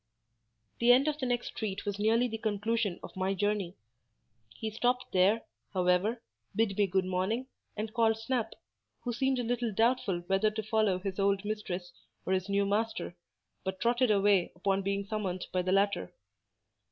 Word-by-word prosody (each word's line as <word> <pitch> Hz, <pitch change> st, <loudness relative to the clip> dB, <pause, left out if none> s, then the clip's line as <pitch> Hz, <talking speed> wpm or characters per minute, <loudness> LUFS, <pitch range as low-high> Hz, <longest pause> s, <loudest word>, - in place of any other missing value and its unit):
The 235 Hz, +1 st, +6 dB
end 260 Hz, +4 st, +5 dB
of 300 Hz, 0 st, 0 dB
the 260 Hz, -, -1 dB
next 245 Hz, -1 st, -1 dB
street 200 Hz, -3 st, -4 dB
was 205 Hz, 0 st, -3 dB
nearly 225 Hz, +4 st, +3 dB
the 225 Hz, -2 st, -5 dB
conclusion 215 Hz, -2 st, -1 dB
of -, -, -9 dB
my 190 Hz, +1 st, 0 dB
journey. 205 Hz, -2 st, -1 dB, 0.8 s
He 220 Hz, -, -4 dB
stopped 245 Hz, +3 st, 0 dB
there, 195 Hz, +5 st, +3 dB, 0.3 s
however, 185 Hz, +6 st, +2 dB, 0.3 s
bid 220 Hz, -3 st, +1 dB
me 205 Hz, 0 st, +3 dB
good 190 Hz, 0 st, +1 dB
morning, 190 Hz, +7 st, -1 dB, 0.3 s
and 215 Hz, +1 st, -3 dB
called 225 Hz, -2 st, +3 dB
Snap, 225 Hz, 0 st, -2 dB, 0.5 s
who 245 Hz, -, -3 dB
seemed 265 Hz, +2 st, +1 dB
a 245 Hz, -, -1 dB
little 240 Hz, -1 st, -1 dB
doubtful 220 Hz, -4 st, +1 dB
whether 195 Hz, +3 st, +2 dB
to 215 Hz, +1 st, -4 dB
follow 215 Hz, -3 st, +2 dB
his 190 Hz, +1 st, -4 dB
old 200 Hz, 0 st, +2 dB
mistress 195 Hz, -4 st, -4 dB, 0.3 s
or 190 Hz, -, +1 dB
his 185 Hz, +1 st, -1 dB
new 200 Hz, 0 st, +2 dB
master, 210 Hz, -3 st, -1 dB, 0.5 s
but 190 Hz, 0 st, -3 dB
trotted 240 Hz, +1 st, +2 dB
away 200 Hz, -3 st, +3 dB
upon 195 Hz, +2 st, 0 dB
being 200 Hz, +1 st, -1 dB
summoned 195 Hz, -4 st, -3 dB
by 185 Hz, -, +1 dB
the 185 Hz, +1 st, -1 dB
latter. 200 Hz, +1 st, +2 dB
210 Hz, 170 wpm, -31 LUFS, 190-230 Hz, 0.8 s, The